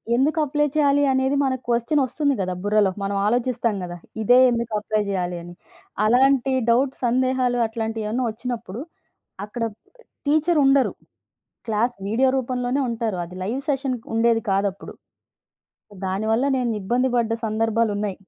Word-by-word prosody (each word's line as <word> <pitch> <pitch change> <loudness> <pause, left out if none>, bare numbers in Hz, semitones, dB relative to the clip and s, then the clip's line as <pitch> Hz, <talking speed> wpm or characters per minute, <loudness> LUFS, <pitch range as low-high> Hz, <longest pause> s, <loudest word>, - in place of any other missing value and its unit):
ఎందుకు 300 +5 +2
అప్లై 295 +1 +1
చెయ్యాలి 285 -1 +3
అనేది 265 +2 +1
మనకు 260 -2 -1
క్వెశ్చన్ 235 +5 +1
వస్తుంది 285 +1 0
కదా 185 -1 -2
బుర్రలో, 205 -1 +3
మనం 200 0 -2
ఆలోచిస్తాం 235 0 0
కదా 175 0 -6 0.3
ఇదే 245 +4 +6
ఎందుకు 235 -1 -2
అప్లై 215 0 -1
చెయ్యాలి 180 -2 -2
అని. 175 0 -10 0.5
అలాంటి 265 +3 +3 0.2
డౌట్స్, 260 +4 +1
సందేహాలు, 255 0 +1
అట్లాంటియి 225 -1 -4
ఏమన్నా 245 +4 -1
వచ్చినప్పుడు, 235 -1 -5 0.6
అక్కడ 230 +2 -5 0.6
టీచర్ 310 +3 +2
ఉండరు. 270 -1 +3 0.8
క్లాస్ 225 +3 +1
వీడియో 245 +5 +2
రూపంలోనే 250 +1 -1
ఉంటారు. 225 -3 -2
అది 180 +2 -11
లైవ్ 240 +8 -2
సెషన్ 270 -2 0 0.2
ఉండేది 230 0 +3
కాదు 195 +1 +2
అప్పుడు. 190 - -11 1.1
దానివల్ల 220 +6 0
నేను 245 -2 0
ఇబ్బంది 245 +5 +1
పడ్డ 225 -1 0
సందర్భాలున్నయ్. 215 -2 0
235 Hz, 135 wpm, -23 LUFS, 215-260 Hz, 1.1 s, ఇదే